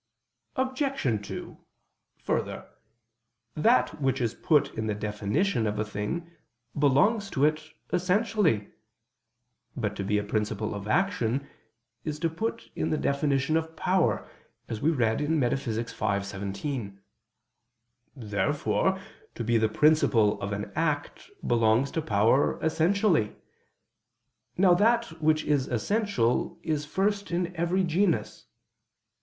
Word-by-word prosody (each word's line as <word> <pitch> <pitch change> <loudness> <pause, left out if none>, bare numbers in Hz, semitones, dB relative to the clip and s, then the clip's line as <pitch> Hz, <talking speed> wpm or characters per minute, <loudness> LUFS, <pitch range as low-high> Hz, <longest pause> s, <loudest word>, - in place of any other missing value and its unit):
Obj. 260 - -1
2: - - -8 0.6
Further, - - -2 0.9
that 125 -2 +2
which 135 0 +1
is 120 -2 0
put 150 +3 +2
in 110 0 -3
the 105 - -1
definition 105 - 0
of 105 0 -2
a 105 - 0
thing, 105 +12 -4 0.4
belongs 195 - +3
to 140 -5 +2
it 155 0 0 0.2
essentially. 180 - +1 1.1
But - - -2
to 100 - -2
be 105 +2 +1
a 105 - 0
principle 105 0 -2
of 100 0 -6
action, 140 - 0 0.6
is 150 -1 -3
put 215 +8 -3
in - - -1
the 155 - +1
definition 140 +1 +1
of 160 0 -1
power, 185 -2 +1 0.4
as 110 - -5
we 155 - +3
read 120 -6 +1
in 155 +2 +1
Metaph. 135 +1 0
v, 110 +2 -1 0.3
text. 100 0 -1
17. 100 +2 -4 1.2
Therefore 115 - 0 0.4
to 120 - -4
be 115 0 +2
the 110 0 +2
principle 120 -5 +3
of 100 +1 -3
an 105 0 -4
act 150 - -2 0.2
belongs 115 +3 +3
to 160 - -1
power 110 +3 +2
essentially. 165 - +2 1.2
Now 180 -1 +6
that 215 -3 +2
which 155 0 +3
is 145 -3 +1
essential 125 - 0
is 150 -2 -2
first 200 +4 0
in 175 0 -2
every 175 +3 +1
genus. 175 +1 0
145 Hz, 125 wpm, -27 LUFS, 110-175 Hz, 1.2 s, Now